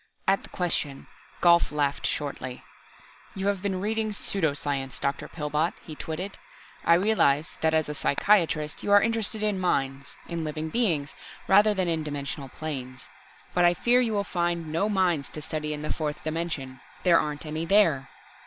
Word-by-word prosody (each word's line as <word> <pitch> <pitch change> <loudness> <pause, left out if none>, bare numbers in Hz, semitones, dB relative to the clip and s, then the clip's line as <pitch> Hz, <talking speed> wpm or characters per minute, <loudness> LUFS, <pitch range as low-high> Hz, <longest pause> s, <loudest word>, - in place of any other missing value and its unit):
At 195 +1 +3
the - - -13
question, 160 -6 -1 0.4
Gault 170 -2 +5
laughed 145 -1 0
shortly. 130 -4 -4 0.7
"You 195 0 -3
have 200 -2 -1
been 190 -2 -1
reading 215 +1 -1
pseudo 170 -7 0
science, 135 -3 -3
Dr. 140 0 -2
Pillbot," 150 +1 -1
he 160 - -8
twitted. 165 +6 -5 0.4
"I 170 - +6
realize 170 -6 +2
that 160 0 +3
as 155 -1 +2
a 150 - -3
psychiatrist, 155 -1 +2
you 205 - -2
are 205 - +9
interested 220 -1 0
in 210 -3 +1
minds, 140 -5 -1
in 170 -1 -3
living 155 +1 -3
beings, 170 - 0 0.3
rather 210 +2 +5
than 185 -2 0
in 165 -2 0
dimensional 140 -2 -5
planes. 130 -4 -6 0.4
But 175 - +3
I 175 0 +5
fear 245 +8 +4
you 230 -3 0
will 200 -1 +1
find 170 -3 -2
no 195 +7 +1
minds 180 -8 +1
to - - -7
study 155 -1 -3
in 150 0 -4
the 150 - -1
fourth 150 -2 -4
dimension. 155 -5 -3 0.2
There 175 -2 +6
aren't 150 0 -3
any 155 +2 -3
there!" 165 -9 +4
160 Hz, 170 wpm, -27 LUFS, 150-190 Hz, 0.7 s, are